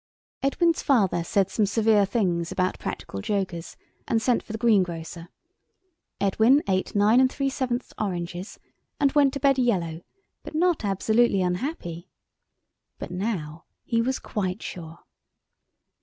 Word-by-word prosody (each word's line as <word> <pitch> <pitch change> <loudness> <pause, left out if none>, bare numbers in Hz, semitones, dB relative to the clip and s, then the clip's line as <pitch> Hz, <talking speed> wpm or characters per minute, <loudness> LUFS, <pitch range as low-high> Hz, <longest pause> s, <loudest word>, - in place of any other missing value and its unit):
Edwin's 330 +5 +2
father 195 - +2
said 195 +2 +1
some 210 -2 +1
severe 215 -1 +3
things 180 -6 0
about 185 0 -1
practical 100 - -5
jokers, 185 - -3 0.3
and 225 - +2
sent 240 +2 +1
for - - -11
the 220 - -3
greengrocer. 175 -7 0 0.9
Edwin 220 +8 +4
ate 190 +1 -1
nine 210 +4 +5
3/7th 260 -2 -2
oranges, 180 -1 -4 0.4
and 280 -1 +3
went 285 -2 +4
to - - -2
bed 275 -1 +3
yellow, 175 -10 0 0.4
but - - -9
not 345 -4 +2
absolutely 205 +1 +2
unhappy. 180 - -3 0.9
But - - -7
now 180 -5 -4 0.2
he 230 -1 +1
was 260 +3 0
quite 190 -1 -3
sure. 165 -1 -8
205 Hz, 125 wpm, -25 LUFS, 180-245 Hz, 0.9 s, nine